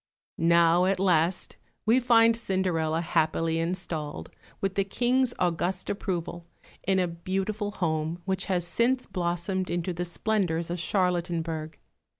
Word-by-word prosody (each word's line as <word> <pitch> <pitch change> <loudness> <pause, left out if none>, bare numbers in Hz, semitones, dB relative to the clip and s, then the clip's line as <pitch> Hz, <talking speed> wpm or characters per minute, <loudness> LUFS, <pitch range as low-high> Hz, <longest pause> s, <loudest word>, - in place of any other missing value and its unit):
Now 170 +1 +5
at 190 0 +1
last 175 -1 +1 0.3
we 230 +4 +5
find 230 -2 +5
Cinderella 180 -7 0
happily 165 0 +1
installed, 165 -3 -3 0.3
with 195 -1 -1
the 195 - +1
King's 245 +5 +1
august 180 +1 -1
approval, 175 -3 -4 0.3
in 190 0 +1
a 180 -1 +2
beautiful 190 +5 -3
home 165 -4 -2
which 190 -1 -1
has 180 -3 0
since 245 +8 +1
blossomed 180 +1 -2
into 175 +1 -1
the 175 +1 -3
splendours 175 -3 -1
of 175 - -3
Charlottenburg. 170 -4 -1
180 Hz, 130 wpm, -27 LUFS, 170-195 Hz, 0.3 s, Now